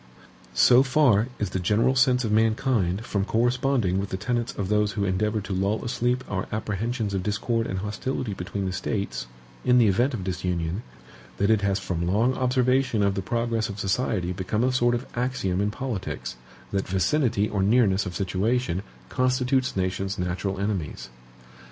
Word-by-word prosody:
So 125 +1 +7
far 130 -5 +3
is 100 -4 -2
the 95 - -1
general 105 +8 +2
sense 130 -1 +3
of 110 - -1
mankind 110 -2 +1
from 100 -4 -1
corresponding 120 -3 +1
with 100 0 -3
the 95 - -3
tenets 120 +3 -1
of 100 - -4
those 105 0 +1
who 100 - -1
endeavor 105 +3 0
to 95 0 -5
lull 100 +5 0
asleep 125 +2 0
our 95 -2 -3
apprehensions 110 +1 -2
of 95 - 0
discord 115 +3 -1
and 95 - -3
hostility 105 +3 -3
between 95 +2 -4
the 95 - -2
States, 95 - -3 0.4
in 125 0 +4
the 120 - +6
event 120 +7 +2
of 100 - -5
disunion, 90 0 -2 0.6
that 100 +2 +2
it 110 -2 +3
has 100 -1 +1
from 85 -3 -3
long 110 +8 +2
observation 130 -3 +2
of 100 -1 +2
the 95 - -2
progress 115 +2 -1
of 100 0 -6
society 95 -3 0
become 95 +5 -1
a 130 - +2
sort 120 -1 +2
of 120 +2 -4
axiom 120 -7 -1
in 105 - +1
politics, 105 - -4 0.4
that 100 -1 -1
vicinity 105 - +1
or 100 -2 -1
nearness 100 -2 +3
of 90 - -6
situation, 100 +1 0 0.3
constitutes 130 - +1
nations 95 +1 -1
natural 90 +2 -2
enemies. 100 -11 -3
105 Hz, 170 wpm, -25 LUFS, 95-120 Hz, 0.6 s, So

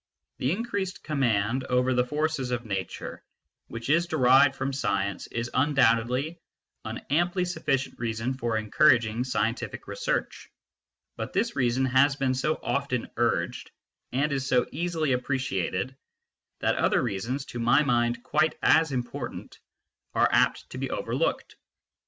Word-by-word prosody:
The 130 - 0
increased 200 -2 -3
command 125 -4 +1
over 125 +1 +2
the 125 0 +3
forces 150 0 -1
of 120 -1 -2
nature 95 -4 -5 0.4
which 115 0 -7
is 170 +4 +3
derived 135 -2 +5
from 135 +1 -2
science 100 -6 -1
is 120 0 -4
un 145 +3 +1
doubtedly 125 +6 +2 0.4
an - - -6
amply 175 +4 +2
sufficient 135 -6 -2
reason 115 +1 -2
for 120 -3 -1
encouraging 115 +1 +3
scientific 115 -2 -2
research, - - -3 0.7
but - - -5
this 235 - 0
reason 130 0 +1
has 135 +2 +4
been 135 -2 0
so 150 +4 0
often 140 -4 -1
urged 120 0 -1 0.4
and 145 +4 0
is 135 -1 -1
so 125 -2 +3
easily 160 -2 -1
appreciated 125 -3 -1 0.7
that - - +1
other - - +2
reasons, 120 +5 -3
to 120 - -7
my 120 +5 +4
mind 120 -2 +1
quite 160 - +1
as 160 -2 +4
important, 125 -2 -5 0.6
are - - +4
apt - - +2
to - - -6
be - - -2
overlooked. - - -2
130 Hz, 140 wpm, -27 LUFS, 120-145 Hz, 0.7 s, derived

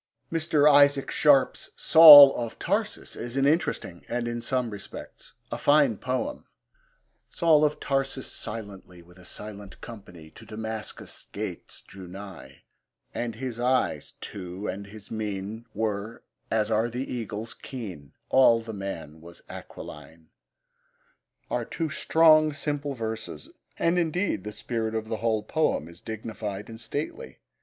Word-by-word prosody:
Mr. 155 -2 +2
Isaac 140 -1 +5
Sharp's 140 -3 +3
Saul 150 -4 +10
of 115 -2 -4
Tarsus 210 +3 -2
is 120 +3 -6
an 135 - +3
interesting, 145 - 0
and, 120 0 -2
in 120 0 -3
some 125 -2 -1
respects, 100 -1 -10 0.2
a - - -4
fine 145 -5 +4
poem. 130 - -3 0.8
Saul 160 -3 +3
of 150 0 +1
Tarsus, 135 -1 -2
silently, 100 -5 -7
With 90 +2 -19
a 90 - -15
silent 105 0 -9
company, 90 -8 -12
To 115 - -15
Damascus' 110 0 -7
gates - - -6
drew 95 -2 -12
nigh. 95 +2 -11 0.5
And 120 -2 -3
his 120 -1 -5
eyes, 125 +1 0
too, 95 +1 -7
and 100 0 -5
his 105 0 -13
mien 110 +1 -5
Were, 110 +1 -3 0.3
as 110 0 0
are 110 +2 +2
the 125 +2 -4
eagles, 110 -1 -5
keen; 95 - -9 0.2
All 125 -3 +5
the 115 -1 -8
man 85 -6 -7
was 85 +1 -13
aquiline 80 +2 -11 1.2
are - - -2
two 160 -3 -4
strong, 155 -1 +4
simple 145 -1 -3
verses, 115 - -6 0.3
and 170 +2 +2
indeed 170 - -1
the 105 - -4
spirit 110 0 -3
of 110 0 -3
the 110 - -2
whole 110 -1 0
poem 155 - 0
is 85 0 -13
dignified 105 -2 -6
and 115 0 -9
stately. 145 - -5
115 Hz, 140 wpm, -26 LUFS, 100-140 Hz, 1.2 s, Saul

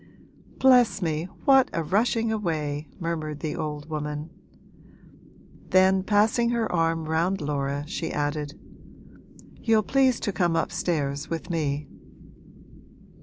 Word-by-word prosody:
'Bless 250 -5 +5
me, 160 -3 -1 0.2
what 270 -3 +6
a 165 - -1
rushing 220 +6 +1
away!' 155 -8 -2
murmured 155 -3 -3
the 155 -2 -3
old 150 -2 -4
woman. 150 0 -4 1.4
Then 190 0 +4
passing 215 +4 +2
her 235 -2 0
arm 165 -1 +1
round 165 +5 0
Laura 145 -1 -2
she 165 +1 -4
added, 145 +1 -3 1.0
'You'll 220 -2 +3
please 265 0 +2
to 205 - -1
come 175 -3 +1
upstairs 150 -5 -1
with 165 +2 -4
me.' 150 -3 -1
165 Hz, 115 wpm, -26 LUFS, 150-205 Hz, 1.4 s, what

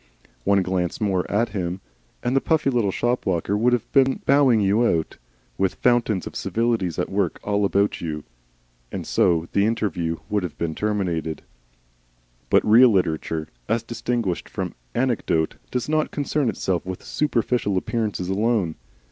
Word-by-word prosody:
One 100 -1 +4
glance 90 -2 -1
more 95 -4 0
at 110 +3 +1
him, 90 -3 -3 0.4
and 125 +2 0
the 135 - +4
puffy 155 -4 +2
little 120 -5 +1
shop 120 +5 -1
walker 95 +2 0
would 115 +4 +3
have 125 -3 -1
been 135 -1 +3
bowing 135 -5 +5
you 100 +3 +3
out, 85 -9 0 0.4
with 95 -1 +1
fountains 120 -6 +2
of - - -8
civilities 115 -7 0
at - - 0
work 95 -3 0
all 105 0 +1
about 100 +1 +1
you. 75 -3 -4 0.7
And - - -5
so 85 -1 +2
the 100 +1 +3
interview 90 -7 -1
would 105 -1 0
have 90 -4 -5 0.2
terminated. 90 -7 -2 1.1
But - - +4
real 120 +4 +7
literature, 80 -5 0 0.2
as 115 0 +1
distinguished 115 -5 -2
from - - -4 0.2
anecdote, 115 -10 0
does 125 -1 -2
not 155 0 +1
concern 145 -2 0
itself 95 -4 -1
with 95 0 -6
superficial 120 -8 0
appearances 105 -2 -2
alone. 100 -4 0
105 Hz, 150 wpm, -23 LUFS, 90-120 Hz, 1.1 s, real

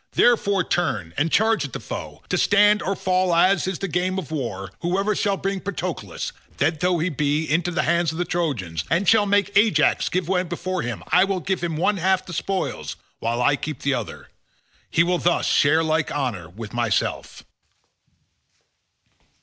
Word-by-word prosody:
Therefore 200 -5 +3
turn, 120 - -1
and 155 +3 0
charge 220 +1 +3
at - - -6
the - - -4
foe, - - -7
to - - +1
stand 205 +1 +4
or 195 - -1
fall 185 -1 +1
as 185 +3 +3
is 190 -2 -2
the 195 - -3
game 180 +2 -1
of 165 -5 -5
war; 100 -10 -4
whoever 195 +4 0
shall 200 0 0
bring 195 0 -2
Patroclus, 180 - -4 0.3
dead 155 +2 +1
though 180 +1 +2
he 170 +3 0
be, 150 0 0
into 165 +3 0
the 175 - 0
hands 170 -1 +1
of 160 - -7
the 175 - -1
Trojans, 120 - -2
and 170 +5 +1
shall 210 0 +5
make 205 0 +1
Ajax 200 -7 +3
give 180 -2 -1
way 180 -1 +2
before 185 +1 -3
him, 120 -2 -5
I 180 - +5
will 195 -1 -1
give 180 +1 -2
him 165 -3 -2
one 200 +5 +1
half 190 +1 +2
of - - -26
the 175 - -8
spoils 195 +1 -3 0.2
while 120 +2 -1
I 145 +2 +4
keep 150 -1 -6
the 140 - +1
other. - - -5 0.6
He 170 - +3
will 175 0 0
thus 175 - +1
share 155 +2 +3
like 160 -1 0
honour 115 - -3
with 105 +4 -9
myself." 120 -3 -1
175 Hz, 190 wpm, -23 LUFS, 145-190 Hz, 0.6 s, shall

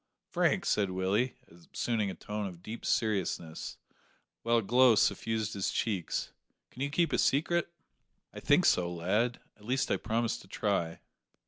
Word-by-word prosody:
"Frank," - - +2
said 100 -2 +2
Willie, 95 +7 0 0.4
assuming 110 -4 0
a 95 - -5
tone 105 -1 -4
of 90 -2 -10
deep 110 +4 -6
seriousness, 95 -7 -1 0.6
while 115 0 +2
a 115 - +1
glow 125 +2 +5
suffused 110 +1 +1
his 100 -2 -1
cheeks, 100 -7 -2 0.4
"can 125 - -10
you 140 - 0
keep 165 +4 +1
a - - +2
secret?" 170 +5 +2 0.6
"I - - -7
think - - +4
so, 90 -1 +3
lad; 105 +8 0 0.2
at 105 - -17
least 130 +3 0
I - - +3
promise 115 +1 -1
to - - -15
try." 95 -5 -1
110 Hz, 155 wpm, -31 LUFS, 95-120 Hz, 0.6 s, glow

